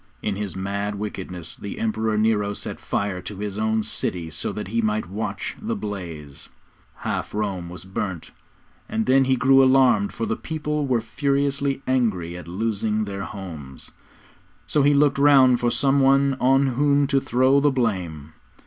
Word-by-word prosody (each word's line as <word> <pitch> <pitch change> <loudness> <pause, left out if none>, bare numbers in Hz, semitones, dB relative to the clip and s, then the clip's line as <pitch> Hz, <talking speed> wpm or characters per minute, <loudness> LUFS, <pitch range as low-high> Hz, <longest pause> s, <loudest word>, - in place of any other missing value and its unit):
In 105 - -1
his 100 -1 -5
mad 100 +2 -3
wickedness, 90 -4 -6
the 100 - -7
Emperor 110 -1 -1
Nero 105 -2 +1
set - - -6
fire 100 -3 -2
to 100 +2 -7
his 105 0 -4
own 110 0 +1
city 90 -6 -3
so - - -2
that 105 -2 -6
he 115 +2 0
might 110 -3 -1
watch 100 -1 -4
the 225 +1 -2
blaze. 85 - -7 0.5
Half - - -4
Rome 95 -5 -2
was 90 +1 -9
burnt, 95 -2 -4 0.6
and 110 0 -1
then 135 +1 +4
he 130 0 +3
grew 135 +1 +5
alarmed, 130 -6 +4
for 115 - -3
the 110 - -1
people 150 -1 -3
were 125 -3 +1
furiously 140 +2 -1
angry 105 -10 0
at 90 -2 -9
losing 110 +3 -1
their 100 -1 -5
homes. 80 -10 -9 0.7
So 150 - +1
he 145 +1 +4
looked 145 -1 +3
round 135 -4 +6
for 120 -1 +1
some 135 +3 +2
one 135 0 +4
on 135 +2 +4
whom 140 +2 +2
to 140 -1 +2
throw 130 +3 +3
the 145 +1 +3
blame. 90 - -2
110 Hz, 165 wpm, -23 LUFS, 100-135 Hz, 0.7 s, round